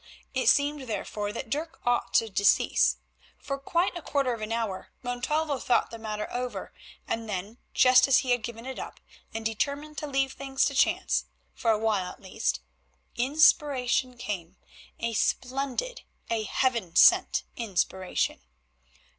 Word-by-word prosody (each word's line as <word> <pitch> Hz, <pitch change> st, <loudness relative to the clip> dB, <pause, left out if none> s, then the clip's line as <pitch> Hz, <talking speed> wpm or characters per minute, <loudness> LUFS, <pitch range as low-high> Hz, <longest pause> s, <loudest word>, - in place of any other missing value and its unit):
It 260 Hz, -1 st, +3 dB
seemed, 285 Hz, -2 st, +2 dB
therefore, 205 Hz, 0 st, -3 dB
that 225 Hz, +1 st, -6 dB
Dirk 315 Hz, +4 st, -3 dB
ought 245 Hz, 0 st, +1 dB
to 225 Hz, -, +4 dB
decease. 200 Hz, -1 st, +3 dB, 0.4 s
For 275 Hz, -1 st, -5 dB
quite 345 Hz, +6 st, 0 dB
a 345 Hz, -, -5 dB
quarter 275 Hz, -4 st, 0 dB
of 230 Hz, -, -6 dB
an 215 Hz, +1 st, -4 dB
hour 225 Hz, -5 st, -2 dB
Montalvo 280 Hz, +4 st, -1 dB
thought 240 Hz, 0 st, +1 dB
the 230 Hz, -, -8 dB
matter 210 Hz, -1 st, -4 dB
over, 250 Hz, 0 st, -4 dB, 0.3 s
and 225 Hz, -1 st, -3 dB
then, 205 Hz, +4 st, -5 dB, 0.2 s
just 255 Hz, 0 st, +6 dB
as 270 Hz, -, +6 dB
he 250 Hz, -, 0 dB
had 245 Hz, -1 st, +2 dB
given 230 Hz, +1 st, -7 dB
it 265 Hz, 0 st, -6 dB
up -, -, -8 dB, 0.3 s
and 225 Hz, 0 st, -5 dB
determined 285 Hz, +7 st, -2 dB
to 300 Hz, -, -5 dB
leave 270 Hz, -1 st, 0 dB
things 270 Hz, -1 st, 0 dB
to 280 Hz, -, 0 dB
chance, 270 Hz, -, +2 dB, 0.3 s
for 230 Hz, -, -1 dB
a 220 Hz, -, +4 dB
while 210 Hz, -4 st, 0 dB
at -, -, -15 dB
least, 190 Hz, -, -2 dB, 0.5 s
inspiration 265 Hz, -2 st, +3 dB
came, 190 Hz, -6 st, -5 dB, 0.4 s
a 230 Hz, 0 st, -2 dB
splendid, 270 Hz, -, -1 dB, 0.3 s
a 220 Hz, -2 st, 0 dB
heaven 230 Hz, -7 st, 0 dB
sent -, -, +6 dB
inspiration. 190 Hz, -4 st, -1 dB
245 Hz, 155 wpm, -28 LUFS, 220-275 Hz, 0.5 s, just